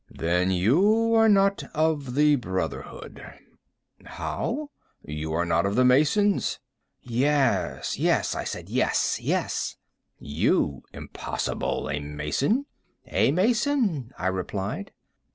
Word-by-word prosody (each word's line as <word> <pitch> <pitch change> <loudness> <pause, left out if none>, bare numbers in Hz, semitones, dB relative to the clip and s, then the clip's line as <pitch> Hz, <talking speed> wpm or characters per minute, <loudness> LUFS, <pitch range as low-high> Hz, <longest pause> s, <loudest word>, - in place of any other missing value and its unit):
"Then 90 +3 0
you 190 - +3
are 225 0 +5
not 195 -1 +3
of 150 -5 0
the 150 0 +5
brotherhood." 95 -8 -5 0.8
"How?" 290 +4 -4 0.3
"You 75 +1 -5
are 85 +2 0
not 85 +2 +1
of 100 - -2
the 125 - +4
masons." 155 +11 +3 0.5
"Yes, 135 +2 0
yes," - - +1
I - - -3
said, - - -6
"yes, - - +1
yes." - - -1 0.4
"You? 70 -1 0
Impossible! - - -4
A 75 +2 -2
mason?" 75 - -1 0.5
"A - - +3
mason," 210 - +1
I 90 - -5
replied. 95 +2 -3
135 Hz, 110 wpm, -25 LUFS, -, 0.8 s, are